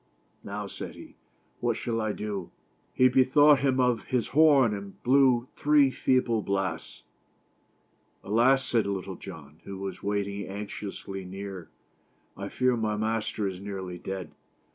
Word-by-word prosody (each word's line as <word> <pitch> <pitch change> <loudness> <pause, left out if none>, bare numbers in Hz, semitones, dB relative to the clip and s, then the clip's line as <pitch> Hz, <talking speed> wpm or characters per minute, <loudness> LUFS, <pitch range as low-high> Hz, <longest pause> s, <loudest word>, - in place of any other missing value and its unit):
" - - -40
Now" 105 +1 -4
said 100 - -7
he, - - -12 0.5
"what - - 0
shall 115 -1 -2
I 110 -1 0
do?" 100 -4 -4 0.5
lie 130 - +7
bethought 135 +3 +5
him 130 -1 +1
of 125 -2 +2
his 125 -3 -1
horn, 140 -7 +5
and 100 -1 -8
blew 130 -2 +4
three 145 -2 +4
feeble 125 -4 +1
blasts. 95 -2 -3 0.6
" - - -41
Alas!" 125 +6 +3
said 115 -4 +1
Little 95 -1 -3
John, 80 -5 -11
who 100 - -7
was 95 -1 -6
waiting 100 -1 -2
anxiously 100 -1 -6
near, 95 -1 -7 0.3
" - - -41 0.3
I 100 +1 -6
fear 125 +2 +2
my 110 -2 -1
master 110 -1 -1
is 95 -1 -6
nearly 95 -3 -6
dead. 95 -4 -5
105 Hz, 150 wpm, -28 LUFS, 95-125 Hz, 0.6 s, lie